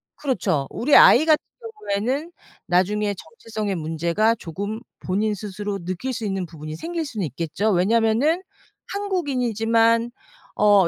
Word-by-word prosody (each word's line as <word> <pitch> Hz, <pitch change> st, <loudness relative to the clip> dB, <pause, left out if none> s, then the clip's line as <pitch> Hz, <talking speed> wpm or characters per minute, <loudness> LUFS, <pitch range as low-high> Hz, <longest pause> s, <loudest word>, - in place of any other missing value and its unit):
그렇죠. 185 Hz, -, -1 dB
우리 285 Hz, +5 st, +2 dB
아이 310 Hz, -, +8 dB
같은 310 Hz, -2 st, +4 dB, 0.5 s
경우에는 260 Hz, +12 st, -1 dB, 0.3 s
나중에 205 Hz, +4 st, +1 dB
정체성의 200 Hz, +4 st, -5 dB
문제가 170 Hz, +7 st, +1 dB
조금 205 Hz, +3 st, -5 dB, 0.2 s
본인 210 Hz, +3 st, -1 dB
스스로 205 Hz, -1 st, -5 dB
느낄 185 Hz, +9 st, -3 dB
수 225 Hz, -2 st, -4 dB
있는 195 Hz, -3 st, -2 dB
부분이 155 Hz, -1 st, -8 dB
생길 330 Hz, -, -4 dB
수는 220 Hz, -, -3 dB
있겠죠. 165 Hz, -, -1 dB
왜냐하면은 225 Hz, -, +2 dB, 0.5 s
한국인이지만 240 Hz, -, +1 dB, 0.5 s
어 205 Hz, -4 st, +6 dB
210 Hz, 315 characters per minute, -23 LUFS, 185-240 Hz, 0.5 s, 아이